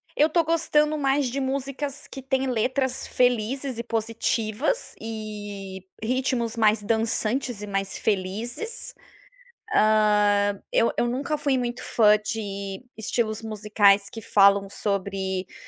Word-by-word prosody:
Eu 300 - +5
estou 335 +1 +2
gostando 305 -2 +2
mais 275 -1 +1
de 265 +3 -3
músicas 275 +1 -3
que 270 - -8
têm 265 0 0
letras 260 +2 0
felizes 250 +1 0
e 235 - -2
positivas, 230 - -1
e, 205 -4 -6 0.2
ritmos 245 -1 0
mais 215 -1 +3
dançantes 225 +2 0
e - - -6
mais 195 -1 -2
felizes. 225 - -2 0.8
Hã, 210 -2 +3
eu 230 - +3
eu 240 - +2
nunca 275 +5 -1
fui 280 -3 +1
muito 245 0 -3
fã 210 -2 +4
de 200 -1 -5
estilos 220 0 -1
musicais 205 -2 +3
que 225 - -8
falam 200 -1 +4
sobre, 195 -2 -2
hã, - - -19
225 Hz, 125 wpm, -25 LUFS, 205-265 Hz, 0.8 s, Eu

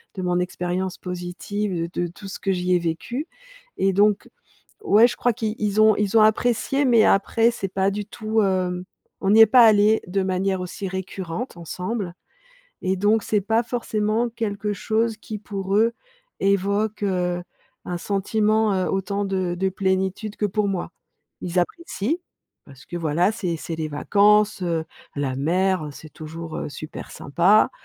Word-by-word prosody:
de 185 - -4
mon 180 0 +1
expérience 180 +1 -2
positive 180 +3 -4 0.2
de - - -3
de - - -1
tout 180 +4 -11
ce - - -7
que 195 - 0
j'y 180 0 0
ai 175 - +3
vécu. 170 - -3 0.5
Et 195 0 +2
donc, 205 +1 +2 0.5
ouais, 230 - +6
je - - -5
crois 245 -2 +2
qu'ils 215 0 -3
ils 210 0 +1
ont 215 -1 +6
ils 210 +2 +1
ont - - +7
apprécié, 245 +5 +2
mais 235 -3 +5
après, 225 +4 +3
c'est 195 -4 -4
pas 195 +1 +2
du 205 0 -4
tout, 220 +1 -1
hem, 185 -1 0 0.4
on 195 0 +2
n'y 220 +1 +8
est - - +11
pas 240 +1 +7
allé, 215 0 +5
de 190 +1 0
manière 190 0 0
aussi 190 +2 -5
récurrente 190 +2 -5
ensemble, 180 +3 -4 0.7
et 190 +1 0
donc, 210 +3 +2
c'est 210 - +1
pas 225 +3 +2
forcément 225 -1 -1
quelque 210 -3 -3
chose 225 +2 0
qui 215 - -7
pour 195 -1 -3
eux, 230 +2 +4 0.5
évoque, 200 +2 +1
heu, 180 -2 0 0.4
un 175 -1 -3
sentiment, 215 +2 +1
heu, 185 -1 0
autant 200 +1 -1
de 185 -2 -1
de 190 0 +1
plénitude 190 +2 -1
que 210 - 0
pour 205 +1 0
moi. 175 -3 -3 0.5
Ils 180 0 -2
apprécient. 305 - -2 0.5
Parce 135 -2 -15
que, 175 - -6
voilà, 170 +5 +1
c'est 180 -6 -2
c'est 165 +1 -5
les 160 -1 -3
vacances, 205 +6 +3
heu, 165 -2 -1 0.3
la 135 -2 -1
mer, 180 +4 +1
heu, - - -6
c'est 155 +2 -12
toujours, 160 +1 -7
heu, - - -4
super 155 +1 -8
sympa. 175 +9 +3
195 Hz, 170 wpm, -23 LUFS, 180-215 Hz, 0.7 s, est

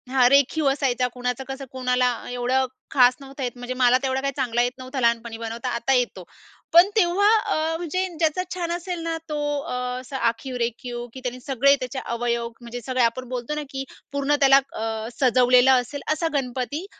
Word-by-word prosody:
हां, 255 -1 +4
रेखीव 280 +2 +3
असायचा, 260 -2 +1
कुणाचं 250 +1 -3
कसं 270 0 -6
कोणाला 250 -1 +1 0.2
एवढं 250 +2 +1 0.3
खास 250 -2 +5
नव्हतं 275 0 -8
येत, 245 - -1
म्हणजे 245 +1 -5
मला 250 0 +4
तेवढा 265 0 0
काही 275 0 -2
चांगला 240 -3 0
येत 245 0 +1
नव्हता 260 +1 -6
लहानपणी 235 -1 +1
बनवता, 230 +2 -4
आता 235 +2 0
येतो. 245 -7 0 0.5
पण 345 +4 +8
तेव्हा 390 0 +3
अ, 325 -7 -1
म्हणजे 360 +3 -2
ज्याचा 320 +2 +1
छान 345 -2 -3
असेल 350 0 -3
ना, 330 0 -2
तो 300 - -2 0.2
अ, 310 - -6 0.3
असा 260 +1 -6
आखीव-रेखीव 240 0 -3
की 260 - -8
त्याने 250 0 -4
सगळे 275 +1 +3
त्याचे 255 +1 -4
अवयव 235 0 -1
म्हणजे 240 +1 -7
सगळे 255 -1 +1
आपण 240 +2 0
बोलतो 250 +3 -3
ना, 300 - -2
की 270 -1 -4 0.3
पूर्ण 280 +1 +1
त्याला 275 0 +7
अ, 220 0 -3
सजवलेलं 250 0 +5
असेल, 280 +3 -7
असा 330 +2 -1
गणपती 270 +4 -2
255 Hz, 180 wpm, -24 LUFS, 245-280 Hz, 0.5 s, पण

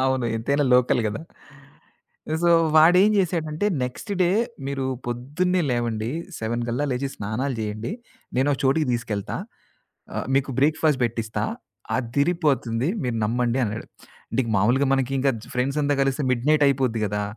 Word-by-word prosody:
అవును 130 -2 +1
ఎంతైనా 140 +6 +1
లోకల్ 125 0 +3
గదా! 110 +7 -4 1.2
సో, 175 - +4 0.3
వాడేం 180 +6 +7
చేసాడంటే, 165 -1 0 0.2
"నెక్స్ట్ 125 - -7
డే 175 - +3 0.4
మీరు 135 -1 -2 0.2
పొద్దున్నే 145 +10 -1
లేవండి, 115 -2 -1 0.3
7 115 +2 -2
కల్లా 125 +5 -1
లేచి, 130 +2 -1
స్నానాలు 115 +7 -2
చేయండి, 110 - -4 0.4
నేను 130 +3 +2
ఒక 135 - -2
చోటికి 145 +3 +3
తీసుకెళ్తా. 110 -4 -3 0.8
ఆహ్, - - -3
మీకు 140 0 +1
బ్రేక్‌ఫాస్ట్ 150 -1 +2
పెట్టిస్తా, 115 -1 -2 0.6
అదిరిపోతుంది 135 -1 0 0.2
మీరు 120 -2 -1
నమ్మండి" 120 +3 0
అన్నాడు. 110 +1 -4 0.4
అంటే 115 - -3
ఇంకా 115 - -3
మామూలుగా 125 +8 +3
మనకింకా 135 +1 +1
జు - - -16
ఫ్రెండ్సంతా 140 +3 0
కలిస్తే 135 +1 0
మిడ్‌నైటయిపోద్ది 135 -3 +2
కదా! 105 +1 -2
130 Hz, 130 wpm, -24 LUFS, 115-145 Hz, 1.2 s, వాడేం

